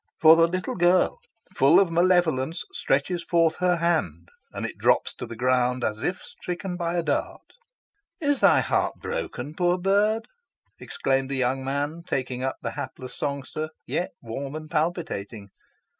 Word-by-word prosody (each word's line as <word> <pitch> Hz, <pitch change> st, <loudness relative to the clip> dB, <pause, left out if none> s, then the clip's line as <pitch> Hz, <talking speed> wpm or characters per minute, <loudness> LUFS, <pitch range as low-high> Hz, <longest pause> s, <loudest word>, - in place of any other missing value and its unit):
For 160 Hz, 0 st, +8 dB
the 165 Hz, 0 st, +5 dB
little 185 Hz, +2 st, -3 dB
girl, 180 Hz, -, +3 dB, 0.4 s
full 150 Hz, +6 st, +6 dB
of 190 Hz, -4 st, +2 dB
malevolence, 170 Hz, -3 st, +2 dB
stretches 170 Hz, +6 st, 0 dB
forth 165 Hz, -2 st, +2 dB
her 180 Hz, 0 st, +2 dB
hand, 155 Hz, -, -1 dB, 0.2 s
and -, -, -4 dB
it -, -, -6 dB
drops -, -, +2 dB
to -, -, -7 dB
the 115 Hz, -, -8 dB
ground, 125 Hz, +1 st, +1 dB
as 110 Hz, 0 st, -2 dB
if 180 Hz, +7 st, -2 dB
stricken 180 Hz, +1 st, -5 dB
by 170 Hz, -1 st, -2 dB
a 170 Hz, -, 0 dB
dart. 150 Hz, -3 st, -3 dB, 0.7 s
"Is 290 Hz, -3 st, +1 dB
thy -, -, +5 dB
heart -, -, 0 dB
broken, 135 Hz, +5 st, -5 dB
poor 175 Hz, +2 st, +1 dB
bird?" 205 Hz, +4 st, +1 dB, 0.5 s
exclaimed 135 Hz, 0 st, -1 dB
the 140 Hz, -, -2 dB
young 130 Hz, +1 st, 0 dB
man, 145 Hz, +4 st, -2 dB
taking 130 Hz, -6 st, -3 dB
up 130 Hz, 0 st, -2 dB
the -, -, -2 dB
hapless 130 Hz, -3 st, -7 dB
songster, 140 Hz, +2 st, -3 dB, 0.2 s
yet 180 Hz, -, -2 dB
warm 135 Hz, +5 st, -5 dB
and 155 Hz, 0 st, -8 dB
palpitating. 135 Hz, -, -2 dB
155 Hz, 160 wpm, -25 LUFS, 130-175 Hz, 0.7 s, For